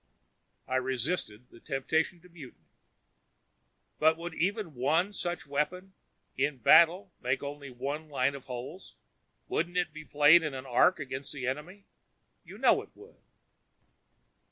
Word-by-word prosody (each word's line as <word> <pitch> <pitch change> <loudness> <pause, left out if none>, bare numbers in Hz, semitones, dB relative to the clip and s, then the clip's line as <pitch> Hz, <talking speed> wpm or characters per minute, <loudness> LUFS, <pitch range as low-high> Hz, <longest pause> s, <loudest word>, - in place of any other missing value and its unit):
I 130 - 0
resisted 125 -3 -2
the 115 - -15
temptation 160 +7 -1
to 180 - -18
mutiny. 155 -7 -14 1.3
"But 160 +1 +4
would 170 +1 -6
even 195 -1 -1
one 160 +10 +1
such 175 -2 -4
weapon, 180 +7 -3 0.4
in 140 +1 0
battle 170 - +5
make 130 +2 -1
only 140 0 -6
one 140 +5 -5
line 140 -1 +1
of 140 -2 -9
holes? 130 +9 -8 0.5
Wouldn't 175 +2 -1
it 175 -3 0
be 155 0 -9
played 150 +3 +6
in 150 -4 -3
an 130 0 -7
arc 135 +9 +3
against 135 0 -5
the 135 -3 -5
enemy? 160 +10 -5 0.6
You - - -12
know - - +4
it - - -14
would." 430 +4 -17
150 Hz, 140 wpm, -30 LUFS, 130-175 Hz, 1.3 s, played